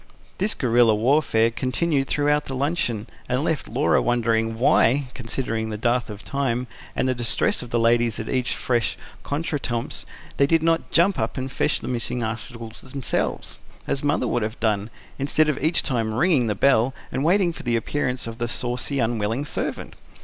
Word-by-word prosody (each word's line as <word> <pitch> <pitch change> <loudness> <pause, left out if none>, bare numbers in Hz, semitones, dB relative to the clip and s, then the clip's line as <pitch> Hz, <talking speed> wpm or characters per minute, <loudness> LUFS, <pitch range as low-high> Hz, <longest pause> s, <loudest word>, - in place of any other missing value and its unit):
This 200 +3 +1
guerilla 120 -3 +4
warfare 115 -1 +3
continued 135 +3 0
throughout 145 0 +1
luncheon, 135 -5 -1 0.2
and 125 +3 +1
left 160 -3 -1
Laura 130 +7 +2
wondering 115 -2 +1
why, 130 +2 +3
considering 115 -2 -3
the 105 - -4
dearth 120 +2 0
of 105 -1 -8
time, 125 -3 -1 0.3
and - - +1
the 130 - +2
distress 120 -2 0
of 125 - -8
the 120 - 0
ladies 115 0 +3
at 110 - -5
each 130 -1 0
fresh 120 -3 0 0.2
contretemps, 140 -6 -3 0.3
they 140 - +4
did 165 +1 +3
not 165 0 +1
jump 175 +3 +3
up 110 0 -2
and 130 +1 -3
fetch 150 - 0
the - - -6
missing 120 -1 -2
articles 115 0 -6
themselves 130 -1 -3 0.3
as 140 - -2
Mother 145 -3 +1
would 120 - 0
have 110 +1 -3
done 105 -1 0 0.3
instead 145 +3 +2
of 150 -2 -1
each 160 +2 +3
time 115 -5 -1
ringing 145 -3 +3
the 105 - 0
bell 130 +2 +3 0.2
and 135 - -1
waiting 175 +1 +3
for - - -9
the 120 -2 0
appearance 125 +2 -1
of 115 +1 -7
the 120 - -1
saucy, 125 +3 0
unwilling 115 +2 0
servant. - - -4
125 Hz, 175 wpm, -23 LUFS, 115-140 Hz, 0.3 s, guerilla